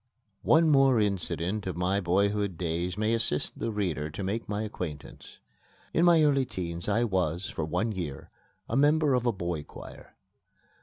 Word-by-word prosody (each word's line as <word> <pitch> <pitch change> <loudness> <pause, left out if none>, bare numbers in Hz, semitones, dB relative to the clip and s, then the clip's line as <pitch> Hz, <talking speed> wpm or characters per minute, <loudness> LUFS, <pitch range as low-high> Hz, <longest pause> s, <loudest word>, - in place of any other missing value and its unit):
One 160 +1 +4
more 135 -5 +5
incident 100 -1 -1
of 90 - -4
my 90 +3 +1
boyhood 100 +1 +1
days 85 +2 -2
may 110 +2 +1
assist 115 -10 -1
the - - -2
reader 85 -8 -2
to 80 +6 -6
make 100 +4 -3
my 105 +1 -2
acquaintance. 85 -8 -7 0.6
In 170 - +3
my 170 -2 +6
early 140 -3 +3
teens 85 -6 -5
I 115 +3 +2
was, 90 -4 -1
for 80 - -3
one 110 +8 -1
year, 85 -9 -6 0.4
a 115 - -3
member 145 +1 +3
of 125 -1 +1
a - - +4
boy 85 -6 -3
choir. - - -12
100 Hz, 165 wpm, -28 LUFS, 85-115 Hz, 0.6 s, my